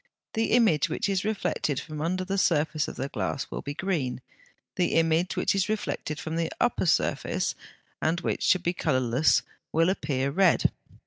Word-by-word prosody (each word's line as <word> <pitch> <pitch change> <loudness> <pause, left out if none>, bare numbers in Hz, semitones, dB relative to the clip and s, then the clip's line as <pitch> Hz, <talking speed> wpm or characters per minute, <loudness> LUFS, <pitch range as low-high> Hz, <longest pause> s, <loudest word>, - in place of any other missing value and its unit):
The 225 0 0
image 220 -12 +4
which - - -1
is 195 -2 0
reflected 200 -9 -1
from 155 -2 -7
the 155 - -1
under 185 +3 -1
surface 155 -4 +1
of - - -6
the 135 - -3
glass 140 - -3
will - - -4
be 145 0 -5
green; 155 -11 -1 0.6
the 180 -2 +1
image 165 +2 +2
which - - +2
is 195 +1 0
reflected 185 -7 -3
from 160 -1 -4
the 165 -1 -1
upper 240 -6 +1
surface, 160 - +1 0.5
and 165 +2 +1
which - - -2
should 185 -1 +3
be 175 - +1
colourless, 130 -3 +2 0.3
will 165 +3 +3
appear 140 -6 -1
red. 185 +3 +3
165 Hz, 175 wpm, -27 LUFS, 150-190 Hz, 0.6 s, image